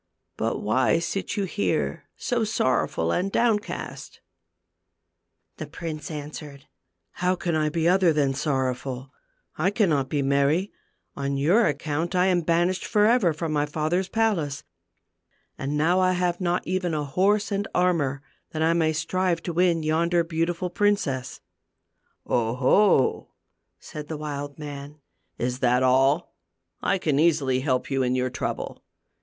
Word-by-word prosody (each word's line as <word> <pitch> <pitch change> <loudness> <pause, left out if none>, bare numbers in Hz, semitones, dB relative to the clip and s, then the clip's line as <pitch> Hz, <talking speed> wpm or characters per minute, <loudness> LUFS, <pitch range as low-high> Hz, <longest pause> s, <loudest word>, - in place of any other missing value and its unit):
But - - -2
why 130 +9 +2
sit 185 +5 -3
you 200 - +1
here 200 +2 -1
so 240 -3 -1
sorrowful 130 - 0
and 195 +2 0
downcast? 225 -2 -1 0.7
" - - -53
The - - -6
prince 155 -4 -6
answered, 150 -2 -8 0.3
" 85 0 -54
How 180 +1 +2
can 175 -2 -2
I 155 -1 +1
be 165 +1 0
other 180 -1 +4
than 145 -3 +1
sorrowful? 130 -2 -2 0.5
I 175 +5 +3
cannot 165 - +1
be 145 -2 0
merry. 140 +7 +2 0.4
On 140 0 -2
your 180 +12 +4
account 155 +4 -2
I 180 0 +4
am 180 -2 +2
banished 175 +3 +1
forever 210 -3 +3
from 160 +1 -3
my 145 0 +1
father's 160 +5 -1
palace, 190 -11 0 0.9
and 140 +2 -3
now 170 +5 +3
I 185 0 +3
have 180 0 -1
not 175 0 0
even 180 -2 -1
a 150 -1 -2
horse 200 +9 +1
and 200 0 -1
armor 150 -7 +1 0.3
that 160 0 -1
I 165 +1 +3
may 160 -2 +2
strive 175 +1 -1
to 175 - -3
win 170 -1 +2
yonder 170 +2 +2
beautiful 170 +2 -2
princess." 165 -12 0 0.4
" - - -37
0, 115 0 0
ho! 135 +3 +3 0.3
" - - -53
said 150 -1 -8
the 155 - -5
wild 145 -1 -5
man; 145 0 -8 0.2
" - - -48
is 125 +1 -2
that 125 0 +3
all? 135 +5 +3 0.5
I 195 - +1
can 150 -6 0
easily 150 -6 +2
help 130 0 -1
you 135 0 +1
in 125 0 +1
your 130 0 0
trouble. - - -4
160 Hz, 155 wpm, -25 LUFS, 140-180 Hz, 0.9 s, other